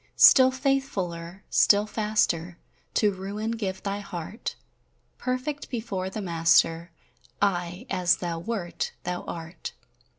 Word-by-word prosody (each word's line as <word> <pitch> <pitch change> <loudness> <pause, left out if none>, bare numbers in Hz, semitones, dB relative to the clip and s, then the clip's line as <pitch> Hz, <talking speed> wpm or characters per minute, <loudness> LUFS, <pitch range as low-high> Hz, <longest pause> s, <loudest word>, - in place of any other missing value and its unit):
Still 260 -1 +8
faithfuller, 195 -11 -2
still 205 0 +5
faster, 210 -6 0 0.4
To 210 -2 +4
ruin 200 +4 -4
give 195 -5 -3
thy 200 0 -2
heart: 185 +2 -6 0.6
Perfect 255 +4 -3
before 215 -6 -3
the 205 +2 -5
Master 165 -1 +3 0.5
Aye 180 -3 0
as 180 -1 +3
thou 170 -2 -3
wert, 185 -2 -3
thou 180 0 -2
art. 170 +1 -7
190 Hz, 110 wpm, -27 LUFS, 175-220 Hz, 0.6 s, Still